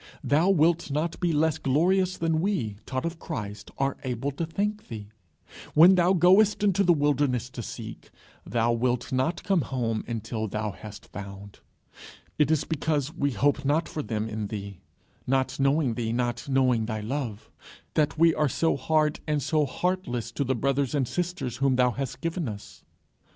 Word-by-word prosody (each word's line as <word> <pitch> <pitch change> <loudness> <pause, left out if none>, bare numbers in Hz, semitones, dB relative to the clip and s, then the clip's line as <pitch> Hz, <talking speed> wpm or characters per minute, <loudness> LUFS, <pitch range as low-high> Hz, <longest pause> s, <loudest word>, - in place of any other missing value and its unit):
thou 160 +6 +3
wilt 170 -2 +3
not 155 +4 -2
be 175 -2 +1
less 160 +1 +1
glorious 185 +7 +2
than 160 -1 +1
we, 165 - -1
taught 130 +1 -2
of 170 0 -4
Christ, 105 -5 -6
are 135 0 0
able 130 +2 -2
to 160 +4 -4
think 210 +5 -2
thee. 105 -3 -8 0.7
When 170 +5 +9
thou 180 0 +4
goest 190 +4 +5
into 200 -1 +3
the 180 - +5
wilderness 145 -5 +1
to 120 - -6
seek, - - -8 0.3
thou 115 +2 +1
wilt 120 +2 0
not 130 +7 0
come 195 -4 +2
home 115 -4 -2
until 110 -1 -3
thou 105 +1 -3
hast 105 +2 -11
found. 100 0 -9 0.8
It 150 -2 +4
is 155 -2 +2
because 150 -2 -1
we 140 - 0
hope 140 +5 +1
not 150 +4 +1
for 155 - -4
them 110 -5 -3
in 110 -1 -4
thee, 100 -3 -6 0.5
not 135 +1 0
knowing 135 -2 +2
thee, 115 -1 -2
not 120 +2 -2
knowing 130 -4 +2
thy 110 -2 -3
love, 115 -2 -4 0.4
that 155 0 +1
we 165 0 +5
are 150 -2 +1
so 165 +6 +1
hard 155 +2 +1
and 150 -1 +1
so 145 +1 +1
heartless 130 -7 -2
to 140 - -1
the 130 0 0
brothers 140 +2 0
and 135 -4 +1
sisters 135 -4 -3
whom 135 0 +2
thou 125 -1 +3
hast 135 +1 -5
given 165 -4 -2
us. 100 -1 -10
140 Hz, 175 wpm, -27 LUFS, 120-160 Hz, 0.8 s, When